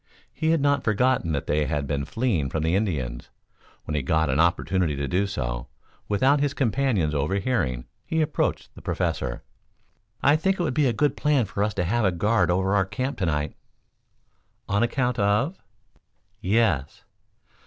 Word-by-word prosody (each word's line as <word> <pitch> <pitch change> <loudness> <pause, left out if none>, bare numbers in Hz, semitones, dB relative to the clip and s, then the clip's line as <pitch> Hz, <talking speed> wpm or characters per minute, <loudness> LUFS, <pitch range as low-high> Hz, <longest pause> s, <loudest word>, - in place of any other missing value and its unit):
He 160 - -1
had 165 -2 +3
not 145 0 +2
forgotten 110 -4 +1
that 70 - -2
they 75 0 +1
had 75 0 -1
been 70 -1 -2
fleeing 95 - 0
from 75 +3 -2
the 80 +1 +1
Indians. 75 - -2 0.5
When 75 - -5
he 75 - 0
got 80 +1 +1
an 70 - 0
opportunity 85 -1 +2
to 70 0 -2
do 95 +8 +1
so, - - -4 0.4
without 130 +8 +3
his 140 0 0
companions 115 - +1
overhearing, 75 - -1 0.2
he 160 - -2
approached 155 -1 -1
the - - -13
Professor. - - -2 0.8
"I 145 +2 +5
think 190 +4 0
it - - +1
would 150 -6 -1
be 145 +1 +3
a - - +2
good 145 +6 +1
plan 145 -5 +2
for 100 +1 -2
us 105 0 -1
to - - 0
have 120 +7 0
a 95 - +3
guard 90 +1 +2
over 95 +2 +1
our 100 -1 +4
camp 130 +8 -4
to 95 - 0
night." 75 -1 -1 1.1
"On 100 +1 +1
account 125 0 0
of?" 105 - +1 0.8
"Yes." 95 - +1
100 Hz, 175 wpm, -25 LUFS, 75-130 Hz, 1.1 s, I